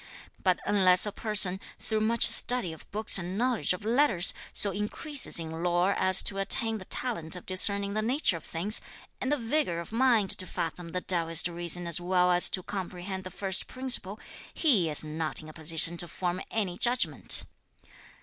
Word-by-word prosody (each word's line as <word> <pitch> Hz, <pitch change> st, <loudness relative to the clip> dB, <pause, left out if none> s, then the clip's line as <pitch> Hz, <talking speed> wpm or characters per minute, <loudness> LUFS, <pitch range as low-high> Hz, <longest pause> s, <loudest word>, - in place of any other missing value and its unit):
But 185 Hz, -2 st, 0 dB
unless 185 Hz, -2 st, +4 dB
a 210 Hz, -, -3 dB
person, 200 Hz, -3 st, +1 dB, 0.2 s
through 220 Hz, -1 st, -4 dB
much 225 Hz, +2 st, +3 dB
study 245 Hz, -9 st, +3 dB
of 160 Hz, -, -16 dB
books 215 Hz, -1 st, +3 dB
and 180 Hz, +2 st, -6 dB
knowledge 245 Hz, -1 st, -1 dB
of 180 Hz, +3 st, -5 dB
letters, 230 Hz, -6 st, +1 dB, 0.2 s
so 200 Hz, -, +4 dB
increases 250 Hz, -, +1 dB
(in 160 Hz, 0 st, -4 dB
lore) 175 Hz, +2 st, 0 dB
as 185 Hz, 0 st, +3 dB
to 195 Hz, -, +4 dB
attain 220 Hz, +3 st, +1 dB
the 190 Hz, -, -12 dB
talent 185 Hz, -11 st, -3 dB
of 180 Hz, -, -11 dB
discerning 200 Hz, +2 st, +2 dB
the 215 Hz, -, -1 dB
nature 245 Hz, -, -1 dB
of 165 Hz, -, -9 dB
things, 190 Hz, +6 st, 0 dB, 0.4 s
and 260 Hz, -, -3 dB
the 295 Hz, -, +1 dB
vigour 230 Hz, -, -2 dB
of 170 Hz, -, -9 dB
mind 230 Hz, -4 st, +1 dB
to 185 Hz, -, -3 dB
fathom 170 Hz, +1 st, -6 dB
the 180 Hz, -, -3 dB
Taoist 165 Hz, -2 st, +2 dB
reason 175 Hz, 0 st, 0 dB
as 170 Hz, 0 st, -1 dB
well 180 Hz, 0 st, +1 dB
as 175 Hz, 0 st, +4 dB
to 185 Hz, -, -2 dB
comprehend 190 Hz, 0 st, -7 dB
the -, -, -7 dB
first 190 Hz, 0 st, -2 dB
principle, 245 Hz, -6 st, -1 dB, 0.3 s
he 220 Hz, -, +1 dB
is 150 Hz, -, -1 dB
not 155 Hz, +1 st, -4 dB
in 155 Hz, -, -12 dB
a -, -, -12 dB
position 165 Hz, +2 st, +1 dB
to 175 Hz, -, -4 dB
form 180 Hz, +2 st, -5 dB
any 190 Hz, -5 st, -3 dB
judgment." 245 Hz, +1 st, +2 dB
185 Hz, 185 wpm, -27 LUFS, 175-215 Hz, 0.4 s, unless